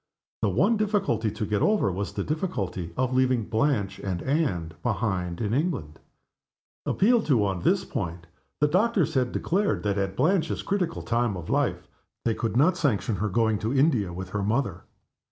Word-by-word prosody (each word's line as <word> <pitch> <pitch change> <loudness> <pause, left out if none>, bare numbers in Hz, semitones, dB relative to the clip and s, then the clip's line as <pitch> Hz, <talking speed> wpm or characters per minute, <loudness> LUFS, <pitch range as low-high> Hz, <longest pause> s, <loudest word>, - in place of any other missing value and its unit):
The 105 - +2
one 190 - +3
difficulty 195 - +1
to 105 +1 -4
get 105 0 0
over 210 - +3
was 100 +3 -4
the - - -2
difficulty 100 - -3
of 130 0 0
leaving 130 -2 +2
Blanche 110 -4 0
and 95 -3 -3
Anne 130 - 0
behind 95 -6 -1
in 105 -1 -1
England. 130 - -2 0.9
Appealed 230 +3 +3
to 120 -9 +3
on 95 -2 -1
this - - +2
point, 85 0 -4 0.4
the 150 - +5
doctors 190 +2 +2
had 125 -2 +1
declared 200 +4 0
that 100 -1 0
at 95 -1 -2
Blanche's 165 - +1
critical 180 -4 -1
time 115 -4 0
of 85 - -6
life - - 0 0.4
they 115 - +2
could 115 0 -2
not 175 +7 +4
sanction 115 - 0
her 105 +4 -1
going 110 +1 +1
to 110 +5 -2
India 130 - +3
with 95 +1 -6
her 105 +2 -2
mother. 105 -3 -1
115 Hz, 170 wpm, -26 LUFS, 100-155 Hz, 0.9 s, the